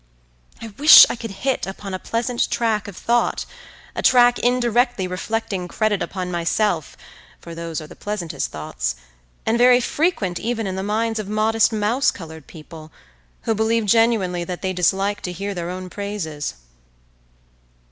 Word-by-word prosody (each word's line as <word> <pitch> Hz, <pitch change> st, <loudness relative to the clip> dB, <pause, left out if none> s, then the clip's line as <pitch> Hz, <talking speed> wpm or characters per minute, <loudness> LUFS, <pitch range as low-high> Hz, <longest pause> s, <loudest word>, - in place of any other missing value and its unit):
I 230 Hz, -, -8 dB
wish 300 Hz, +2 st, +10 dB
I -, -, -3 dB
could 230 Hz, -1 st, -7 dB, 0.2 s
hit 265 Hz, -6 st, 0 dB
upon 195 Hz, 0 st, -7 dB
a 185 Hz, -, -3 dB
pleasant 235 Hz, +3 st, -1 dB
track 220 Hz, -3 st, 0 dB
of 200 Hz, -, -9 dB
thought, 240 Hz, 0 st, 0 dB, 0.5 s
a -, -, -2 dB
track 245 Hz, -1 st, +5 dB
indirectly 245 Hz, -3 st, +1 dB
reflecting 190 Hz, +1 st, -3 dB
credit 210 Hz, +1 st, 0 dB
upon 185 Hz, -2 st, -4 dB
myself, 175 Hz, -1 st, -1 dB, 0.4 s
for 170 Hz, -, -10 dB
those 165 Hz, -1 st, -5 dB
are 155 Hz, -, -8 dB
the -, -, -13 dB
pleasantest 175 Hz, -9 st, -4 dB
thoughts, 60 Hz, -5 st, -4 dB, 0.5 s
and 230 Hz, +2 st, +1 dB
very 245 Hz, 0 st, +6 dB
frequent 245 Hz, -, -1 dB
even 225 Hz, -1 st, -2 dB
in 190 Hz, -1 st, -3 dB
the 190 Hz, -, -3 dB
minds 220 Hz, +2 st, -1 dB
of 205 Hz, -2 st, -5 dB
modest 215 Hz, +2 st, +2 dB
mouse 220 Hz, +5 st, +1 dB
coloured 160 Hz, -4 st, -8 dB
people, 155 Hz, -1 st, -12 dB, 0.5 s
who 225 Hz, -, +1 dB
believe 220 Hz, +1 st, +1 dB
genuinely 205 Hz, -5 st, +2 dB
that 180 Hz, +2 st, -6 dB
they 190 Hz, 0 st, -1 dB
dislike 195 Hz, +3 st, 0 dB
to 180 Hz, -, -4 dB
hear 200 Hz, +3 st, -4 dB
their 175 Hz, -2 st, -4 dB
own 185 Hz, 0 st, -6 dB
praises. 180 Hz, -, -5 dB
205 Hz, 155 wpm, -21 LUFS, 180-230 Hz, 0.5 s, wish